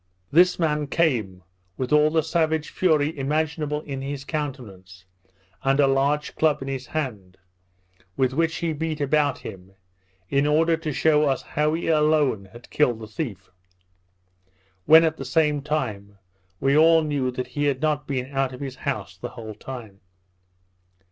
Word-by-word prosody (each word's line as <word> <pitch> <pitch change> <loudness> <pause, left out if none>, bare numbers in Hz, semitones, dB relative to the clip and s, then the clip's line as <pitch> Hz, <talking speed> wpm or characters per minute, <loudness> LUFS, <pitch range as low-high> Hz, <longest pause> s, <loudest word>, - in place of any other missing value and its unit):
This 180 +4 +5
man 150 -3 0
came, 115 - 0 0.3
with 130 +2 -2
all 150 0 +5
the 160 0 +1
savage 160 -1 0
fury 155 -4 +1
imaginable 150 +1 -1
in 140 -3 -6
his 140 0 -5
countenance, 105 - -6 0.6
and 135 +1 +2
a 145 - +6
large 140 +2 +1
club 155 -2 +2
in - - -8
his 135 -1 -4
hand, 105 -12 -5 0.8
with 130 -1 +1
which 165 +2 +1
he 165 -2 -2
beat 155 0 -3
about 145 0 +1
him, 95 0 -11 0.5
in 140 +7 +1
order 165 +2 +3
to 160 -1 -4
shew 150 +2 +3
us 135 -2 0
how 150 +1 0
he 170 - -4
alone 150 -9 +2
had 120 +5 -15
killed 125 -6 +2
the 110 - -7
thief; 105 - -6 1.4
when, 160 +1 +8
at 160 -1 0
the - - -5
same 150 +2 +1
time, 110 -10 -3 0.4
we 135 +1 +2
all 160 +1 +6
knew 145 -4 -1
that 125 0 -4
he 145 +4 -2
had 140 -2 +1
not 150 -1 -1
been 130 -3 -2
out 135 -1 0
of 125 - -9
his 135 -2 -6
house - - -4
the - - -7
whole 110 -1 -8
time. 110 -3 -9
145 Hz, 160 wpm, -24 LUFS, 130-155 Hz, 1.4 s, when